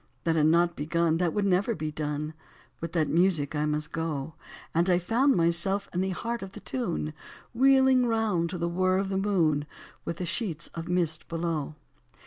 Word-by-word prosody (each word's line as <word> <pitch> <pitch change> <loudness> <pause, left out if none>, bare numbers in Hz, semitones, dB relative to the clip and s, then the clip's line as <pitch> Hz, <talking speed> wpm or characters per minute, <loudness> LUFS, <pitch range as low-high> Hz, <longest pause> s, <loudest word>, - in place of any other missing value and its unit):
That 165 -1 +1
had 155 -1 +4
not 170 +1 +3
begun. 165 +2 +1
That 175 -1 +1
would 205 +2 0
never 195 +4 +2
be 155 -2 -3
done, 150 0 -3 0.5
With 165 0 -5
that 160 -4 +2
music 165 -4 +2
I 150 0 +1
must 150 0 -2
go: 155 -2 -3 0.4
And 170 +3 +2
I 175 - +5
found 235 +10 +2
myself 175 +4 +1
in 180 - 0
the 190 - 0
heart 230 +5 -3
of 195 0 -8
the - - -8
tune. 175 -11 -3 0.4
Wheeling 265 0 +5
round 215 -7 +1
to 180 - -4
the 170 0 -1
whirr 185 +2 +1
of 195 0 -1
the 190 - -1
moon, 165 -7 +1 0.4
With 170 - -4
the 180 - -3
sheets 175 -3 -2
of 165 +1 -7
mist 170 -3 0
below. 165 -3 -3
170 Hz, 190 wpm, -28 LUFS, 160-195 Hz, 0.5 s, I